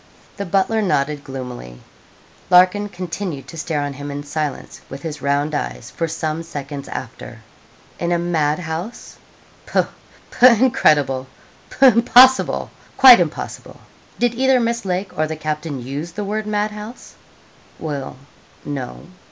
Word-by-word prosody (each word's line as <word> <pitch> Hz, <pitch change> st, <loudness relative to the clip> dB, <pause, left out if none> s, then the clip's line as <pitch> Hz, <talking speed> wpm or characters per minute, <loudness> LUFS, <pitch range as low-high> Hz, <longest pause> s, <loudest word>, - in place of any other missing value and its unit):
The 200 Hz, -2 st, -4 dB
butler 195 Hz, +5 st, +1 dB
nodded 150 Hz, -7 st, 0 dB
gloomily. 125 Hz, -, -8 dB, 0.7 s
Larkin 185 Hz, +3 st, +5 dB
continued 180 Hz, -5 st, -5 dB
to -, -, -10 dB
stare 155 Hz, -2 st, -2 dB
on 145 Hz, -1 st, -3 dB
him 145 Hz, +1 st, -7 dB
in 145 Hz, 0 st, -5 dB
silence, 145 Hz, -1 st, -5 dB
with 135 Hz, +1 st, -9 dB
his 150 Hz, -4 st, -6 dB
round 140 Hz, +2 st, 0 dB
eyes, -, -, -4 dB
for 165 Hz, -, -2 dB
some 160 Hz, 0 st, -3 dB
seconds 145 Hz, -3 st, -7 dB
after. -, -, -8 dB, 0.6 s
'In 170 Hz, 0 st, -1 dB
a 175 Hz, -, +3 dB
mad 160 Hz, -3 st, 0 dB
house! 175 Hz, +6 st, -6 dB, 0.5 s
Pooh, -, -, +2 dB, 0.5 s
pooh! 250 Hz, -, +6 dB
incredible! 150 Hz, -, +3 dB, 0.4 s
Pooh! 270 Hz, -, +3 dB
impossible 250 Hz, +2 st, +5 dB, 0.3 s
quite 255 Hz, -3 st, +10 dB
impossible. 165 Hz, -3 st, -4 dB, 0.4 s
Did 240 Hz, -1 st, +1 dB
either 260 Hz, +1 st, +3 dB
Miss 235 Hz, -2 st, -1 dB
Lake 185 Hz, +1 st, -2 dB
or 155 Hz, -2 st, 0 dB
the 160 Hz, -, -4 dB
captain 150 Hz, -4 st, -4 dB
use 145 Hz, +6 st, -5 dB
the 210 Hz, -, -4 dB
word 210 Hz, +1 st, -3 dB
mad 210 Hz, 0 st, 0 dB
house?' 210 Hz, +3 st, -10 dB, 0.6 s
'Well, 145 Hz, -4 st, -5 dB, 0.5 s
no.' 135 Hz, -4 st, -6 dB
165 Hz, 140 wpm, -20 LUFS, 145-205 Hz, 0.7 s, quite